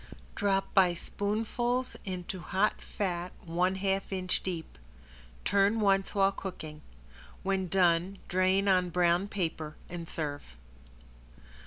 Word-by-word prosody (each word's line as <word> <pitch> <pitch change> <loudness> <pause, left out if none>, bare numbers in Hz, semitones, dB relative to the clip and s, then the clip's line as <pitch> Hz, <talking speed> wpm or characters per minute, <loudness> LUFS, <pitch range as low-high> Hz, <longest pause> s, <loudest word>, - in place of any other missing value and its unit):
Drop 195 -2 0
by 185 -3 +5
spoonfuls 230 +7 -1
into 185 -1 -4
hot 190 +4 +1
fat 180 -3 -3
one 180 +3 +1
half 195 0 -1
inch 185 -1 -1
deep. 165 - -5 0.7
Turn 200 +3 +3
once 195 -1 +2
while 195 -1 +4
cooking. 160 -6 -7 0.6
When 190 -1 0
done, 180 +1 +3
drain 185 +2 +2
on 185 -2 +4
brown 175 +2 +3
paper 160 -6 -3
and 170 -1 -6
serve. 145 - -3
185 Hz, 115 wpm, -30 LUFS, 175-195 Hz, 0.7 s, by